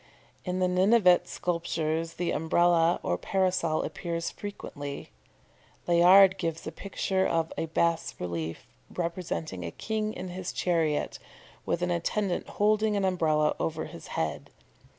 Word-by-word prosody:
In 180 0 -2
the 185 0 +2
Ninevite 185 0 +4
sculptures 165 -1 -2
the 175 -1 -2
Umbrella 170 +1 +3
or 90 - -1
Parasol 185 -4 0
appears 170 -2 -3
frequently. 145 -8 -7 0.7
Layard 185 +3 +6
gives 165 -1 -3
a 155 - -4
picture 190 +2 -1
of 165 -1 0
a 165 - -2
bas 165 +1 0
relief 85 -2 -4 0.2
representing 170 - -4
a 85 - -3
king 215 - -3
in 185 - -6
his 180 0 -5
chariot, 165 -4 0 0.5
with 175 - 0
an 180 - 0
attendant 175 +2 -1
holding 215 0 +3
an 195 - +1
Umbrella 155 -5 +2
over 160 -1 -2
his - - -10
head. - - -2
175 Hz, 130 wpm, -28 LUFS, 160-185 Hz, 0.7 s, Layard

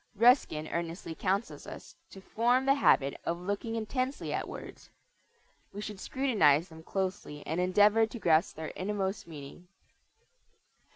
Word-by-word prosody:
Ruskin 215 - +4
earnestly 170 0 -4
counsels 195 +6 -2
us - - -10
to 195 - -12
form 245 +6 +1
the 275 - +5
habit 140 - +3
of 170 +1 -2
looking 205 +5 -3
intensely 255 +5 -2
at - - -2
words. - - -10 0.8
We 205 - -6
should 210 -2 -6
scrutinize 190 - +2
them 160 0 -12
closely 185 -5 -4
and 160 +4 -1
endeavor 205 +4 +4
to 230 - -8
grasp 165 -6 +2
their 160 0 -6
innermost 195 0 -2
meaning. 155 +3 -10
190 Hz, 135 wpm, -30 LUFS, 165-225 Hz, 0.8 s, the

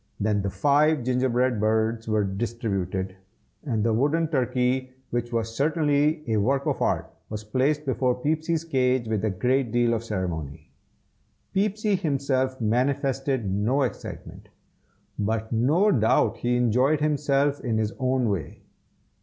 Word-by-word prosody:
Then 105 -1 +1
the 100 - -2
five 145 +4 +2
gingerbread 125 -1 +1
birds 110 +1 0
were 110 -1 +1
distributed, 95 -3 -3 0.5
and 115 -8 -1
the 115 0 +2
wooden 150 +7 +1
turkey, 130 -2 0 0.2
which 120 0 -2
was 115 -1 -2
certainly 150 +1 +1
a 110 - +1
work 135 +7 +1
of - - -1
art, - - -1 0.2
was 105 0 -5
placed 135 +7 0
before 130 -2 +1
Peepsy's 160 +3 0
cage 130 -6 +1
with 110 -2 -1
a 110 - +2
great 125 +6 0
deal 120 0 +2
of 115 0 -2
ceremony. 90 -10 -4 0.8
Peepsy 210 +1 +1
himself 135 -7 0
manifested 130 +2 0
no 105 +9 +1
excitement, 125 - -6 0.7
but 110 +1 -1
no 150 - +3
doubt 110 -1 +2
he 120 0 0
enjoyed 125 +5 +2
himself 145 -1 +1
in 115 -4 -1
his 110 0 -1
own 130 -1 +1
way. 100 -6 -4
125 Hz, 135 wpm, -25 LUFS, 110-140 Hz, 0.8 s, no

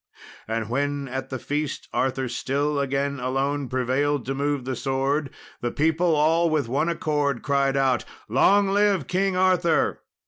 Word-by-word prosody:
And 110 0 -2
when 140 +3 -1
at 130 +1 -5
the 130 - -3
feast 145 +3 -3
Arthur 130 0 0
still 140 +4 -1
again 140 0 -1
alone 135 +2 -1
prevailed 130 +1 0
to 135 - -2
move 140 -1 -1
the 130 0 -2
sword, 135 +3 -1 0.3
the 120 - -2
people 160 +4 +1
all 165 +3 +3
with 155 -6 0
one 140 +7 0
accord 145 -6 -1
cried 140 0 +1
out, 130 -3 +2 0.2
"Long 195 - +4
live 200 -5 +2
King 190 +4 0
Arthur! 185 -3 +2
140 Hz, 150 wpm, -24 LUFS, 130-155 Hz, 0.3 s, Long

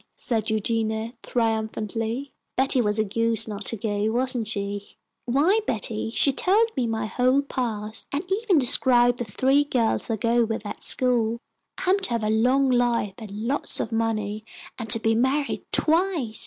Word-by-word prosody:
said 225 -2 -1
Eugenia, 220 +1 -1
triumphantly. 225 +2 -2 0.2
"Betty 265 0 +3
was 210 -1 +2
a 215 - +3
goose 225 +1 +1
not 205 -1 -6
to 230 - -3
go, 210 +1 -1
wasn't 245 -1 0
she? 200 -1 -5 0.3
Why, 295 - +3
Betty, 220 -1 -2
she 270 +4 +3
told 425 - +2
me 255 -4 0
my 225 0 -2
whole 255 +5 +1
past, 220 -5 -3
and 285 +4 -2 0.2
even 410 -7 +2
described 245 -2 +4
the 240 - -2
three 265 +7 +2
girls 245 -6 -1
I 225 - +1
go 230 +2 +1
with 225 -1 -3
at - - -7
school. 235 -3 +1 0.4
I 370 - 0
am 395 - +3
to 390 - -1
have 230 -2 -1
a 215 - 0
long 255 +4 +2
life 240 -5 +1
and 220 -3 -9 0.2
lots 280 +3 0
of 225 - -3
money, 215 -2 -2 0.4
and 225 -2 -6
to 225 - +5
be 225 0 +1
married 265 +5 0
twice. 320 - +1
230 Hz, 170 wpm, -24 LUFS, 220-260 Hz, 0.4 s, to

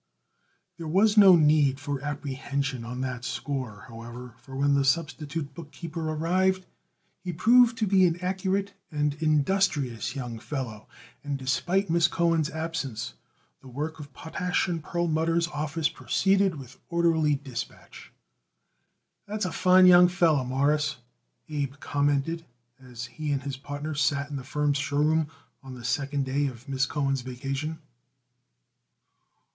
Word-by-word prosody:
There 165 - -6
was 200 +6 +3
no 195 -4 +9
need 150 -4 +4
for 145 -2 -4
apprehension 140 -2 -3
on 125 +2 -5
that 125 -2 -4
score, 125 -7 -4
however, 120 +1 -9
for 135 +1 -11
when 140 +1 +2
the 140 0 +3
substitute 150 0 -1
bookkeeper 160 +1 -6
arrived 185 +4 +1 0.6
he 180 - -3
proved 235 +7 +5
to 220 - +1
be 190 -2 +5
an 170 0 -2
accurate 190 +2 -1 0.2
and 150 -2 0
industrious 150 - +1
young 120 -4 -5
fellow, 115 -6 -5 0.4
and 145 -1 -2
despite 175 +8 0
Miss 170 0 +4
Cohen's 165 -3 +1
absence 150 - -4 0.5
the - - -15
work 150 +5 -5
of 145 -2 -9
Potash 180 +8 -2
& - - -7
Perlmutter's 165 0 0
office 150 +1 -1
proceeded 195 +3 +1
with 130 -3 -11
orderly 165 -3 +2
dispatch. 135 -4 -8 1.2
"That's 210 -1 -2
a 180 - -2
fine 185 +2 +5
young 180 0 +8
feller, 170 -6 +2
Mawruss," 145 +3 +1 0.5
Abe 145 -3 -3
commented 145 +3 0 0.4
as 125 -2 -8
he 150 +5 -4
and 140 -1 -1
his 140 -2 -4
partner 145 +3 -5
sat 140 +1 0
in - - -4
the 135 - -5
firm's 145 +1 0
show 140 0 -2
room 155 +1 +3 0.3
on 135 -2 -9
the 120 -1 -9
second 140 +1 -1
day 140 +2 0
of 125 -2 -9
Miss 135 -1 0
Cohen's 135 -2 -1
vacation. 135 +5 -4
150 Hz, 140 wpm, -27 LUFS, 135-170 Hz, 1.2 s, no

